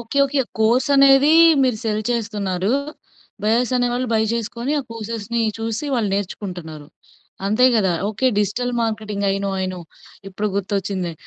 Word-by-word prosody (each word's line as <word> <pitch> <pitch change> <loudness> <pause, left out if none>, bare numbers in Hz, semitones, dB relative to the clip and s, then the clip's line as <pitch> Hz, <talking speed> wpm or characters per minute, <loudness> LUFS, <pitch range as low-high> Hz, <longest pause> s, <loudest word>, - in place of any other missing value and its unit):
Okay. 235 +4 -3
Okay. 275 0 0 0.2
కోర్సనేదీ 270 +5 +5 0.3
మీరు 250 -4 +1
cell 215 -1 -1
చేస్తున్నారు. 205 -4 -1 0.7
Buyers 235 +4 +1
అనే 245 0 +1
వాళ్ళు, 250 +1 -1
బయ్ 220 0 +2
జేసుకొని, 235 +3 -3
ఆ - - -8
కోర్సెస్‌ని 230 +1 -3 0.2
చూసి, 225 +4 -3
వాళ్ళు 225 -4 0
నేర్చుకుంటున్నారు. 180 -6 -6 0.6
అంతే 215 +5 +4
గదా! 195 -5 +2 0.2
Okay. 220 +5 -1
Digital 240 +5 -1
marketing. 215 -2 -2
I - - 0
know. 200 - -1
I - - 0
know. 185 - -7 0.5
ఇప్పుడు 205 +2 -3
గుర్తొచ్చింది. 190 -3 -2
220 Hz, 145 wpm, -20 LUFS, 200-245 Hz, 0.7 s, కోర్సనేదీ